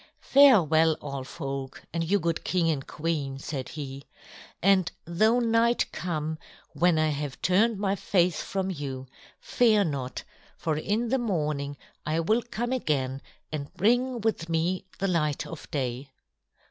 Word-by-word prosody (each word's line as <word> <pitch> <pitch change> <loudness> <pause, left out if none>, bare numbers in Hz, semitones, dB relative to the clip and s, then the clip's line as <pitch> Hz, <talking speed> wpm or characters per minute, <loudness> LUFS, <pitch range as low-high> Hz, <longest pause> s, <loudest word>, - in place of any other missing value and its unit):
"Farewell, 165 - +5
all 140 -2 -5
folk, 135 0 -6
and 165 0 0
you 190 +5 +2
good 170 -2 -1
king 170 -3 +1
and 135 -3 -3
queen," 150 -4 -2
said 135 -1 -5
he. 140 -3 -7 0.5
"And 190 -1 +3
though 215 +8 +3
night 235 0 +2
come 160 -2 -3 0.3
when 175 -2 +3
I 155 0 +3
have 145 -2 -4
turned 205 +5 +3
my 195 0 0
face 180 -3 +1
from 190 -1 -2
you, 135 -5 -5 0.3
fear 220 -4 +3
not. 135 -6 -3 0.3
For 160 -2 -1
in 215 +9 -1
the 265 +2 +2
morning 150 -10 -1 0.3
I 155 +2 0
will 215 +9 +2
come 240 0 -4
again 140 - -1 0.3
and 145 -2 -4
bring 245 +4 +2
with 210 -6 -1
me 170 +3 0
the 195 - 0
light 155 -5 0
of 165 - -9
day." 130 -1 -3
165 Hz, 145 wpm, -27 LUFS, 145-205 Hz, 0.5 s, Farewell